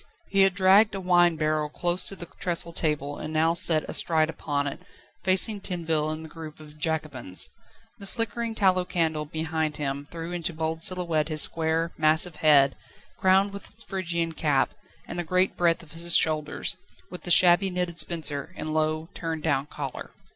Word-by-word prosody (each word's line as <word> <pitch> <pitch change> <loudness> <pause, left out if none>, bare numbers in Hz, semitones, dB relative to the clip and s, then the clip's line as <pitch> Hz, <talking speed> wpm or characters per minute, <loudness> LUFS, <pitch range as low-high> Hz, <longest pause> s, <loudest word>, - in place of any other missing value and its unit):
He 195 -1 +2
had 195 -1 +4
dragged 200 +3 +5
a - - -3
wine 175 -2 +3
barrel 155 -1 -1
close 175 +3 0
to 195 - -1
the 175 - -7
trestle 170 -1 -2
table, 145 -3 -1
and 155 - -6
now 160 +1 +2
sat 165 -2 +3
astride 160 -1 0
upon 145 -2 -3
it, 140 - -5 0.4
facing 195 +2 +2
Tinville 165 -5 -2
and 155 +1 -5
the - - -11
group 155 -1 -10
of 150 0 -14
Jacobins. 150 - -2 0.5
The 200 - -10
flickering 230 0 -2
tallow 185 -3 +3
candle 160 -4 -1
behind 160 0 -3
him 140 0 -4
threw 165 0 -7
into 175 -1 -3
bold 160 0 -3
silhouette 170 -4 +1
his 155 -1 +1
square, 165 +1 0
massive 155 +1 +3
head, 140 -3 +4 0.4
crowned 190 +2 +3
with 200 - -8
its 220 +2 -10
Phrygian 170 -4 -2
cap, 150 -4 0 0.3
and 175 - -5
the - - -1
great 185 +3 +1
breadth 170 -1 +1
of 155 - -16
his 170 +1 0
shoulders, 155 -1 0 0.3
with 180 - -8
the - - -7
shabby 175 +2 +7
knitted 180 -2 -3
spencer 155 0 -1
and 155 - -4
low, 155 0 0
turned 165 -2 -5
down 145 -2 0
collar. 140 -3 -7
165 Hz, 175 wpm, -26 LUFS, 155-180 Hz, 0.5 s, shabby